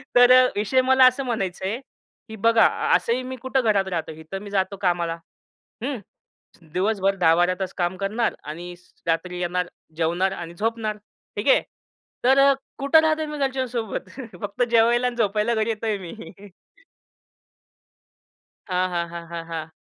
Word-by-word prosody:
तर, 245 0 +7 0.2
विषय 215 +6 +2
मला 260 0 +5
असं 255 +2 +4
म्हणायचंय, 195 -2 -2 0.5
की 220 - -7
बघा 230 +1 +4 0.3
असं 230 - +1
ही 255 +1 -2
मी 260 +1 -5
कुठं 260 +2 -1
घरात 205 -5 +2
राहतो 165 -2 -3
इथं, 160 +4 -8
मी 205 - -8
जातो 195 0 -1
कामाला. 175 -3 0 0.7
हं. 265 -1 -2 0.7
दिवसभर 195 0 +1
10-12तास 180 +2 +2
काम 175 0 -1
करणार 210 +4 -1
आणि 170 +4 -7 0.3
रात्री 175 +2 -1
येणार, 180 0 -1 0.3
जेवणार 170 +4 +1
आणि 170 -3 -7
झोपणार, 215 +2 -2 0.4
ठीक - - -3
आहे. - - +6 0.6
तर 265 +2 +5 0.4
कुठे 280 +3 +5
राहतोय 315 0 +1
मी 300 0 -6
घरच्यांसोबत? 255 -7 -2 0.3
फक्त 210 +4 -1
जेवायला 235 +2 +4
आणि 245 - -3
झोपायला 220 +1 +1
घरी 220 +1 0
येतोय 220 -1 -1
मी 180 -3 -8 2.6
हां, 185 0 +1
हां, 170 -1 -2
हां, 170 0 -8
हां, 170 -1 -5
हां. 160 -1 -6
205 Hz, 140 wpm, -23 LUFS, 180-240 Hz, 2.6 s, तर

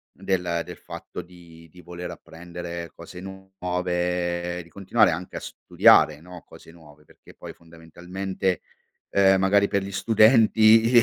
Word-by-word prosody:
del 90 -3 -2
del 90 0 -10
fatto - - -9
di 85 -2 -16
di 90 +3 -16
voler 90 +1 -8
apprendere 85 0 -9
cose 90 - -11
nuove, 90 -2 -3
di 85 - -20
continuare 100 +5 +2
anche 90 +3 -6
a - - -4
studiare, 75 -1 +3
no, 90 0 -12
cose - - -15
nuove 75 -3 -19
perché - - -19
poi - - -10
fondamentalmente, 90 +3 -5 0.5
uhm, 95 -1 +4
magari 100 +1 +3
per 100 -1 -1
gli 100 - -7
studenti 110 +2 +4
i - - +11
90 Hz, 140 wpm, -24 LUFS, 85-95 Hz, 0.5 s, i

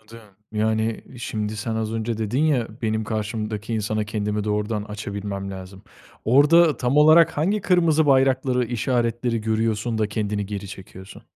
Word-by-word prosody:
Anladım. 110 +1 -14 0.3
Yani, 110 +1 0 0.2
şimdi 110 -2 -4
sen 110 +2 -3
az 110 0 -2
önce 115 0 -2
dedin 115 +6 0
ya, 130 -7 +1
benim 110 0 -1
karşımdaki 110 0 -3
insana 110 0 -1
kendimi 105 0 -2
doğrudan 105 0 -1
açabilmem 100 -1 -5
lazım. 95 0 -9 0.4
Orada 150 +4 +5
tam 125 +4 0
olarak 155 +2 +6
hangi 195 +8 +1
kırmızı 165 -5 +3
bayrakları, 130 -2 +3
işaretleri 120 0 -1
görüyorsun 110 +1 -1
da 110 - +1
kendini 105 -1 -2
geri 100 -1 -6
çekiyorsun? 95 -1 -11
110 Hz, 145 wpm, -23 LUFS, 105-125 Hz, 0.4 s, olarak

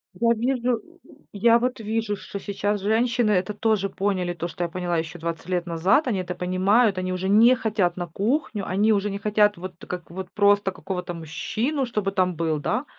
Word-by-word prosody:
Я 230 0 +1
вижу, 245 +1 0
у 345 +1 -21
у - - -22
я 230 +3 +5
вот 250 0 -1
вижу, 220 -1 -2
что 200 +1 -8
сейчас 205 0 -2
женщины 230 +2 +2
это 185 +2 +1
тоже 205 -2 0
поняли, 185 -3 -1
то 170 0 -4
что 175 0 -3
поняла 175 0 -2
еще 160 +1 -4
20 165 +1 -5
лет 175 -1 -1
назад, 180 - +2
они 205 -6 0
это 180 0 -4
понимают, 190 +4 +2
они 185 0 -2
уже 190 +1 -2
не 230 +5 +6
хотят 210 -7 0
на 175 -1 -4
кухню, 210 - -1
они 205 +4 +2
уже 205 0 +1
не 200 - -4
хотят 210 -1 +2
вот 185 +1 -7
как 180 -2 -6
вот 185 +1 -7
просто 205 -2 +3
какого-то 180 -1 -5
мужчину, 225 - -2
чтобы 210 -5 -2
там 185 -2 +1
был, 160 -1 0
да. 220 - -1
200 Hz, 200 wpm, -24 LUFS, 180-220 Hz, -, не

